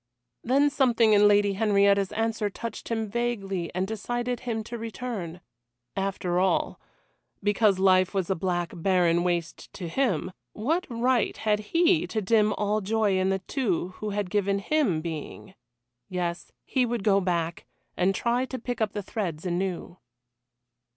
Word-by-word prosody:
Then 280 +4 +3
something 235 -5 +3
in 205 - +5
the 210 - +7
Lady 205 -1 +4
Henrietta's 200 -1 +3
answer 225 -1 -1
touched 230 +2 -7
him 225 -1 -1
vaguely 200 -6 -2
and 185 +1 0
decided 240 +3 -3
him 225 -3 -3
to 235 - -7
return. 220 -6 -5 0.5
After 195 -2 -1
all 190 +1 +1 0.6
because 205 -1 +3
life 185 -1 +4
was 190 -4 -1
a 190 - +1
black 175 -1 -1
barren 175 -1 +2
waste 175 -2 -2
to 180 - -6
him 190 - 0 0.2
what 320 - -1
right 240 -1 +1
had 210 -1 +1
he 335 - +2
to 220 - -2
dim 215 +1 +3
all 210 +1 0
joy 205 -1 +1
in 185 0 +1
the 195 -1 -1
two 200 - -1
who 215 - -4
had 205 -3 -3
given 200 -1 +1
him 200 - +1
being? 165 +3 -7 0.6
Yes, 175 -2 -3
he 260 - +1
would 240 -3 -2
go 200 -2 +4
back, 170 -2 -2 0.3
and 190 +2 +2
try 240 +4 +1
to 260 - -6
pick 245 -1 -5
up 215 -1 0
the 205 - -4
threads 180 -6 -4
anew. 180 0 -3
205 Hz, 155 wpm, -27 LUFS, 185-230 Hz, 0.6 s, the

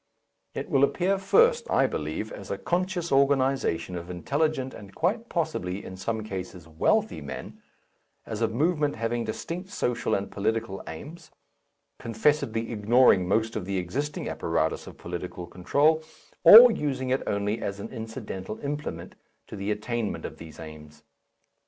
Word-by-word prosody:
It - - -4
will 135 0 +3
appear 185 +7 +2
first, 470 - +4
I - - +4
believe, - - -3
as - - -9
a - - -2
conscious 180 -1 -1
organization 135 -10 +2
of 85 0 -6
intelligent 135 - -1
and 100 -1 -12
quite 220 +8 0
possibly 100 - -2
in 95 - -7
some 110 +3 -3
cases 95 -4 -7
wealthy 80 0 +1
men, - - -8 0.6
as 110 0 -5
a 115 - +3
movement 150 +5 +1
having 115 +1 -2
distinct 170 - -5
social 125 -11 -1
and 100 - -3
political 110 -1 -2
aims, 150 - -9 0.7
confessedly 115 -1 0
ignoring 110 -3 +4
most 110 +3 +1
of 105 - -3
the 100 0 -2
existing 140 +12 -3
apparatus - - -1
of - - -11
political 90 0 -6
control, 145 - +2 0.4
or 235 +3 +11
using 130 -8 -2
it 130 - +2
only 105 +2 -1
as 100 0 -3
an - - -6
incidental 110 -3 -6
implement 140 - -5 0.4
in 105 - -6
the 100 +1 -3
attainment 105 +1 -2
of - - -7
these 80 -2 -11
aims. 75 -1 -11
115 Hz, 145 wpm, -27 LUFS, 95-150 Hz, 0.7 s, or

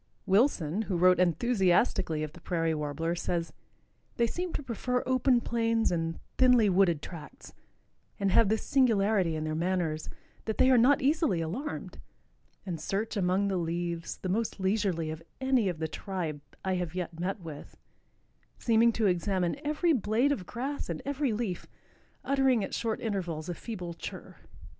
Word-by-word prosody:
Wilson, 195 - +2
who 185 - +1
wrote 180 +1 +5
enthusiastically 180 -4 +2
of 150 -1 -5
the 175 - -14
Prairie 165 -1 0
Warbler, 150 +2 -2
says: 170 -1 -2 0.6
"They 235 - +3
seem 355 +9 -3
to 295 - -3
prefer 250 0 -1
open 255 -1 +3
plains 230 -1 +1
and 165 -1 -2 0.2
thinly 250 -5 +6
wooded 175 -5 +3
tracts, 155 -5 -10 0.7
and 200 -1 +1
have 225 0 +5
this 220 +1 0
singularity 210 - +3
in 155 - -3
their 155 0 -2
manners, 165 -2 -1 0.4
that 220 - -2
they 260 - +5
are 255 - +6
not 260 +3 +4
easily 290 - +2
alarmed, 215 - -4 0.7
and 170 -5 -4
search 205 +7 -2
among 190 0 +1
the 195 -2 0
leaves 170 0 -3
the - - -5
most 215 +2 -1
leisurely 190 -5 0
of 160 +1 -7 0.2
any 260 -6 +2
of 175 - -4
the 160 0 -2
tribe 160 -4 -4 0.2
I 190 -1 +1
have 175 -1 -4
yet 170 -2 -4
met 190 +4 -2
with, 160 -5 -10 0.8
seeming 230 0 +4
to 220 - 0
examine 185 +4 0
every 305 +3 +2
blade 235 +3 +2
of 190 -11 -3
grass 270 +1 -4
and 165 -2 -4
every 280 -2 0
leaf, 210 -5 -3 0.6
uttering 265 -4 +2
at - - -5
short 225 -1 -1
intervals 180 -8 -3
a - - -1
feeble 180 -3 -6
chirr." 165 - -8
195 Hz, 160 wpm, -29 LUFS, 170-235 Hz, 0.8 s, thinly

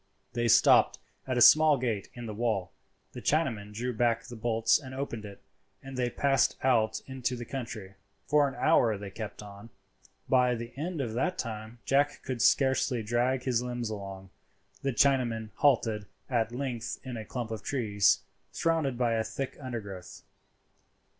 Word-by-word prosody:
They 120 0 0
stopped 120 +1 +5 0.3
at 130 -1 -1
a - - +2
small 155 +2 +7
gate 115 -6 -2
in 120 -1 -7
the 110 - -5
wall, 105 -4 -1 0.4
the - - -8
Chinaman 120 -10 0
drew 120 +4 -3
back 115 0 +1
the 120 - -9
bolts 115 +2 +2
and 130 -3 -9
opened 120 -5 -4
it, 100 -1 -11 0.4
and 135 0 -8
they 125 -1 0
passed 135 +1 +2
out 115 -4 +2
into 130 -1 -3
the 120 -1 -6
country. 115 -7 -6 0.3
For 145 -1 +4
an 135 - -6
hour 120 -10 +3
they 100 0 -8
kept 105 0 -7
on. 100 +2 -11 0.6
By 125 -1 +3
the 115 +1 -7
end 160 +2 -3
of 115 -4 -3
that 180 +10 -1
time 110 -4 -5
Jack 145 +1 +1
could 130 -3 -3
scarcely 130 -3 +3
drag 120 +4 0
his 125 -3 +1
limbs 120 -2 -3
along. 95 -2 -7 0.5
The 135 - 0
Chinaman 120 -5 +1
halted 115 -7 +2 0.2
at 115 -2 +1
length 125 -2 -4
in 130 -2 -6
a 110 - -5
clump 120 0 -5
of 110 -2 -4
trees, 105 -7 +2 0.3
surrounded 160 -6 0
by 120 -2 +1
a 110 -1 +1
thick 135 +4 -5
undergrowth. 100 -8 -7
120 Hz, 165 wpm, -29 LUFS, 110-130 Hz, 0.6 s, small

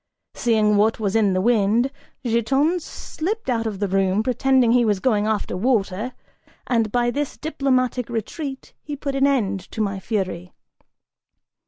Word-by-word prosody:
Seeing 215 -3 +2
what 220 +2 +2
was 205 -1 -1
in 210 -4 +3
the 185 - +1
wind, 230 +3 +2 0.3
Giton 270 +9 +2
slipped 365 - -4
out 230 -2 0
of 210 -3 -4
the 205 +1 -1
room, 195 +2 +1
pretending 255 0 +3
he 245 0 +4
was 210 -4 +1
going 210 -2 +1
after 215 -4 -1
water, 220 +1 0 0.5
and 225 -4 +1
by 240 0 +1
this 290 +2 -3
diplomatic 255 -5 0
retreat 265 - -5
he 295 - -6
put 280 0 -4
an 275 +1 +3
end 210 -8 +1
to - - -8
my 200 -2 -1
fury. 185 -4 -3
230 Hz, 155 wpm, -22 LUFS, 205-265 Hz, 0.5 s, he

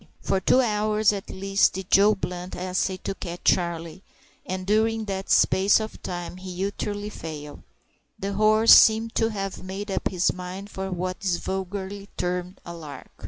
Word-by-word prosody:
For 190 - 0
two 250 +7 +4
hours 215 -2 +2
at 200 -1 -6
least 195 +1 +2
did 190 0 -7
Joe 205 +2 +6
Blunt 180 -1 -5
essay 185 +1 -1
to - - -2
catch 175 -2 -7
Charlie, 170 -1 0 0.5
and 185 0 -4
during 220 +2 +1
that 195 -1 -4
space 195 +3 +4
of 220 0 -6
time 175 0 -5
he 185 0 -4
utterly 205 +1 -4
failed 150 -5 -8 0.6
The 200 +1 -3
horse 215 +2 +6
seemed 225 +1 +6
to 225 - +1
have 195 -3 -4
made 195 +2 -5
up - - -1
his 180 -2 +1
mind 185 +2 -7
for 190 0 -4
what 185 0 -3
is 185 -3 0
vulgarly 195 +2 -5
termed 180 +1 -3
"a 170 - -7
lark." 155 -4 -10
190 Hz, 165 wpm, -25 LUFS, 180-205 Hz, 0.6 s, Joe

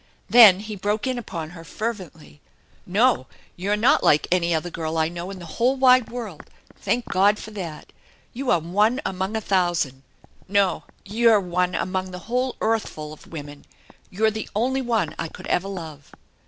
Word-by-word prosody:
Then 210 -6 +8
he 215 0 -6
broke 205 +2 -1
in 255 -2 -1
upon 165 -8 -6
her 165 -2 -11
fervently. 180 -7 -6 0.2
" - - -34
No, 240 - +3 0.3
you're 200 +4 -1
not 230 +5 +3
like 150 - +4
any 175 -1 +2
other 170 +2 -1
girl 160 0 -3
I 160 0 +2
know 175 +2 -6
in 195 - -7
the 175 - -9 0.2
whole 255 +3 +4
wide 255 -2 +5
world. 225 -9 -7 0.3
Thank 245 0 -1
God 200 +3 +3
for 220 - -9
that! 175 -7 -8 0.4
You 260 +1 -4
are - - +5
one 205 - +1
among 190 +3 -2
a 220 - -1
thousand! 175 -9 0 0.5
No, 200 -1 +1 0.2
you're 220 +1 +4
one 180 -1 -1
among 185 0 -2
the 180 - -7
whole 250 +3 -1
earthf 225 -5 0
ul 150 0 -6
of 155 - -15
women 145 -3 -8
I - - -26 0.2
You're 220 +3 +1
the 220 0 -6
only 260 +5 +1
one 225 -10 0
I 165 - -2
could - - -11
ever 185 +2 0
love 160 -7 -8
195 Hz, 185 wpm, -23 LUFS, 170-225 Hz, 0.5 s, Then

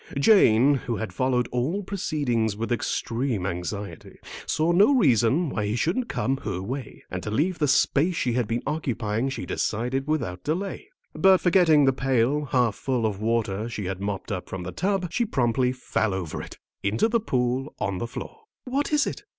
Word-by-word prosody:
Jane, 140 - +5
who 120 - 0
had 110 -4 -5
followed 125 +2 +1
all 145 +12 -1
proceedings 140 - -1
with 115 +2 -3
extreme 120 -2 -1
anxiety, 100 +3 -5 0.3
saw 160 +2 +1
no 205 +11 +5
reason 140 - +3
why 105 -5 -2
he 105 - -1
shouldn't 180 - 0
come 135 +1 0
her 100 -8 -4
way. 125 +5 -6
And 95 - -3
to 105 - -5
leave 160 - 0
the 150 - +2
space 145 +5 +3
she 125 -6 0
had 120 -2 0
been 115 +2 -2
occupying 125 -6 -1
she 135 - -5
decided 125 +5 -2
without 115 - -2
delay. 180 +6 -3 0.2
But 190 +4 +5
forgetting 165 -5 +4
the 135 - +4
pail, 135 +3 +1
half 125 -5 +2
full 125 0 -1
of 105 -2 -2
water 110 -1 -1
she 105 -4 -5
had 95 +1 -4
mopped 100 +1 -4
up 90 -3 -4
from 95 -1 -5
the 90 - -5
tub, 185 - -1
she 240 - +1
promptly 125 - +1
fell 110 -5 -1
over 90 -5 -4
it, - - -10 0.2
into 105 - +1
the 230 +1 +1
pool 130 - -1
on 100 -3 -2
the 120 - -3
floor. 445 - -9 0.2
"What 275 +4 -1
is 295 -2 +3
it?" - - -4
125 Hz, 185 wpm, -25 LUFS, 110-155 Hz, 0.3 s, Jane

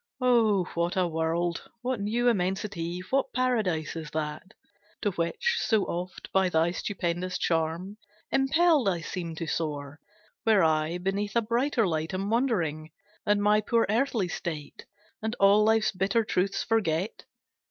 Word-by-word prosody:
O 230 -6 +3
what 170 +2 -1
a 185 -1 +3
world, 165 +1 -1
what 250 -2 -1
new 225 +4 0
immensity, 180 -4 -1
What 270 0 +1
paradise 215 -12 0
is 160 -2 -6
that, 155 +6 -5 0.5
To 205 - +2
which, 175 - -1
so 220 -3 +2
oft, 180 +2 -5
by 190 -1 +3
thy 165 0 +2
stupendous 180 -1 -2
charm 165 +5 -1 0.3
Impelled, 285 - +3
I 175 -3 -1
seem 170 -1 -5
to 165 - -4
soar! 150 -2 -3 0.4
Where 215 -5 +4
I 160 +1 +1
Beneath 195 +3 -2
a 235 - +4
brighter 235 +1 +1
light 160 0 -2
am 195 +3 -2
wandering, 175 - 0 0.4
And 205 0 +3
my 210 +1 +4
poor 230 +2 +2
earthly 230 -4 +1
state, 155 -4 -6 0.3
And 220 +2 -2
all 200 +2 +6
life's 220 0 +3
bitter 195 +4 +1
truths 195 0 0
forget! 195 -4 -1
190 Hz, 145 wpm, -28 LUFS, 165-220 Hz, 0.5 s, all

